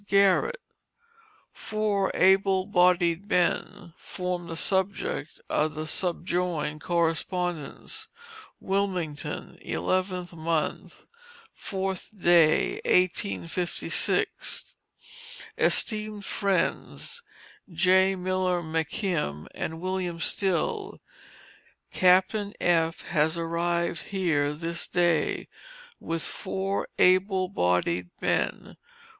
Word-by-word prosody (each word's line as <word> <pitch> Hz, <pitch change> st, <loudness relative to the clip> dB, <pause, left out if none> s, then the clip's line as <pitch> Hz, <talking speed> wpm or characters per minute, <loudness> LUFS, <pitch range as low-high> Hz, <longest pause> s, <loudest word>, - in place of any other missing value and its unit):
GARRETT. 200 Hz, -, +3 dB, 0.9 s
"Four 210 Hz, -2 st, -1 dB
able 190 Hz, 0 st, +4 dB
bodied 180 Hz, -1 st, +2 dB
men," 175 Hz, -2 st, 0 dB
form 180 Hz, -1 st, -4 dB
the 165 Hz, -, -5 dB
subject 200 Hz, -, 0 dB
of 155 Hz, 0 st, 0 dB
the 155 Hz, +1 st, -4 dB
subjoined 170 Hz, -2 st, 0 dB
correspondence: 170 Hz, -1 st, -1 dB, 0.5 s
WILMINGTON, 185 Hz, -6 st, -3 dB
11th 180 Hz, -, -1 dB
mo., 160 Hz, -1 st, -1 dB, 0.7 s
4th, 190 Hz, 0 st, -4 dB
1856. 170 Hz, -, +1 dB, 0.8 s
ESTEEMED 215 Hz, -2 st, +1 dB
FRIENDS, 200 Hz, -, -1 dB, 0.5 s
J. 190 Hz, +3 st, +4 dB
Miller 185 Hz, -1 st, 0 dB
McKim 160 Hz, -, -2 dB
and 160 Hz, 0 st, -4 dB
William 185 Hz, -1 st, -3 dB
Still: 300 Hz, -, -1 dB, 0.9 s
Captain 190 Hz, +3 st, +3 dB
F., 165 Hz, -2 st, +2 dB
has 160 Hz, 0 st, +2 dB
arrived 170 Hz, +1 st, -1 dB
here 160 Hz, -7 st, 0 dB
this 170 Hz, +2 st, -3 dB
day, 175 Hz, -3 st, +1 dB, 0.5 s
with 165 Hz, -1 st, -2 dB
four 195 Hz, +1 st, -2 dB
able 185 Hz, +1 st, +4 dB
bodied 90 Hz, -, 0 dB
men. -, -, -1 dB
180 Hz, 75 wpm, -27 LUFS, 165-190 Hz, 0.9 s, able